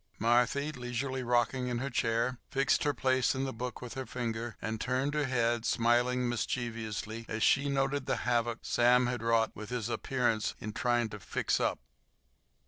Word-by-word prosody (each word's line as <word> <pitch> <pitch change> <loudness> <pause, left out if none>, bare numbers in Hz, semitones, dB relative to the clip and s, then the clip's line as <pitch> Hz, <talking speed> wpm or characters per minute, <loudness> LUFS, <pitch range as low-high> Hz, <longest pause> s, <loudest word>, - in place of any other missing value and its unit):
Marthy, 125 +6 +2
leisurely 125 0 -3
rocking 125 +1 +1
in 120 -1 -1
her 135 +3 -3
chair, 120 +1 0
fixed 135 +1 +2
her 145 - +3
place 130 -1 +2
in 130 - -1
the 135 - -3
book 125 +1 -5
with 125 - -6
her 130 -2 -5
finger, 115 -1 -4
and 110 0 -4
turned 130 +3 0
her 150 -1 +1
head, 120 -2 +1
smiling 120 +1 +2
mischievously 115 -2 -3
as 110 0 -1
she 140 +1 +4
noted 135 0 0
the - - +1
havoc 120 -1 +1
Sam 125 +1 +4
had 120 -2 -2
wrought 115 -1 +2
with 105 -1 -8
his 120 -2 -2
appearance 120 -3 0
in 110 0 -5
trying 120 -1 +1
to 105 - -8
"fix - - -1
up." - - +1
120 Hz, 175 wpm, -31 LUFS, 115-130 Hz, -, she